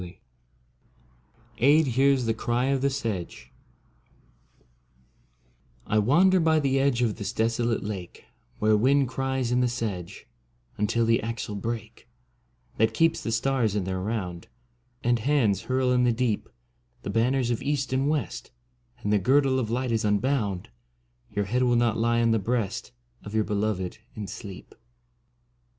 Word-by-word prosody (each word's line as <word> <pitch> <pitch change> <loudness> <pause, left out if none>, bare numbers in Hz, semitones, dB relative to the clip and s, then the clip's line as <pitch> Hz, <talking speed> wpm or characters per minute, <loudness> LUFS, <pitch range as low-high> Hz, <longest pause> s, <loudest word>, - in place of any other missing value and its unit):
42 90 -1 -10 1.5
AEDH 150 +1 +5
HEARS 135 0 +3
THE 115 - +1
CRY 120 +3 -1
OF 135 -1 +1
THE 140 - +2
SEDGE 115 -10 -4 2.3
I 110 - +2
WANDER 175 - +4
by 160 -1 +3
the 135 -2 +1
edge 135 -3 +2
Of 110 -3 0
this 100 -2 -3
desolate 115 +1 0
lake 100 -4 -7 0.3
Where 110 0 +3
wind 135 +5 +3
cries 130 -1 -2
in 125 +1 +2
the 125 - +3
sedge 110 -8 -4 0.5
Until 110 +3 +1
the 115 0 +3
axle 115 -1 -4
break 110 +2 -6 0.7
That 110 +1 +2
keeps 165 0 +2
the 115 - -3
stars 115 -2 +1
in 105 - 0
their 95 0 -3
round 95 -4 -4 0.6
And 120 0 +2
hands 115 -5 +2
hurl 130 0 0
in 125 0 +3
the 120 - +4
deep 115 -2 -1 0.5
The - - -3
banners 120 +2 +1
of 120 - -2
East 140 -2 -1
and 135 +2 +1
West 145 - -2 0.5
And 105 - +1
the 105 - +4
girdle 135 +4 +3
of 115 -4 -2
light 125 +1 -1
is 115 -1 0
unbound. 105 -3 0 0.6
Your 105 0 -2
head 125 +6 0
will 125 -1 +3
not 120 -2 +2
lie 115 +1 +2
on 115 - +3
the 115 - +2
breast 115 +2 -2 0.3
Of 105 +1 -7
your 110 - +3
beloved 105 -3 -2 0.2
in 105 -2 -5
sleep. 95 0 -9
115 Hz, 155 wpm, -26 LUFS, 105-130 Hz, 2.3 s, AEDH